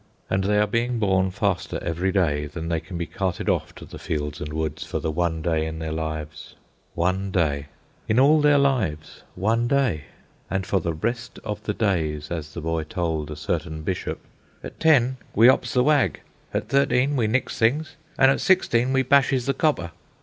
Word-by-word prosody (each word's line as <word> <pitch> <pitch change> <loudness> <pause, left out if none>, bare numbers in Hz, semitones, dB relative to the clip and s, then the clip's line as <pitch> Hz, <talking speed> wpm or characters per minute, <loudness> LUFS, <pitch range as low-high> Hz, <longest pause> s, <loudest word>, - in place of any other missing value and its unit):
And 95 0 +1
they 105 +1 +2
are 105 - +4
being 115 +3 -1
born 95 -3 +2
faster 95 -2 -1
every 85 +3 -1
day 75 -6 +1
than 80 +3 -6
they 85 -1 0
can 85 +2 -8
be 85 - -2
carted 95 -2 -3
off - - 0
to - - -10
the - - -10
fields 75 -1 -3
and 75 - -5
woods 80 -1 -3
for - - -4
the 80 - -2
one 80 0 -1
day 80 -2 0
in 80 0 -5
their 80 -1 -4
lives. 80 -2 -5 0.4
One 95 +3 0
day! 75 -6 0 0.4
In 110 +3 +3
all 150 +3 +5
their 145 -1 +5
lives, 120 - 0
one 115 +5 +1
day! 120 - +1 0.4
And 95 -1 -1
for 95 0 +1
the 85 -2 -3
rest 115 +8 -3
of 105 -1 -4
the 105 -1 -3
days, 80 -8 -1
as 80 -2 -5
the 85 - -4
boy 80 0 -1
told 80 -2 -2
a 75 - -5
certain 80 0 -3
bishop, 90 +3 -3 0.4
"At - - -9
ten 130 -5 +4 0.2
we 115 +3 +7
'ops 130 - +3
the 125 - +4
wag; 140 - +2 0.3
at - - -2
thirteen 140 0 +2
we 120 -5 +1
nicks 125 +5 -1
things; 145 +7 +1 0.2
an' 135 0 +6
at - - 0
sixteen 130 -9 +2
we 135 0 +3
bashes 135 -1 +3
the 135 - +1
copper." 130 - 0
95 Hz, 195 wpm, -24 LUFS, 80-125 Hz, 0.4 s, we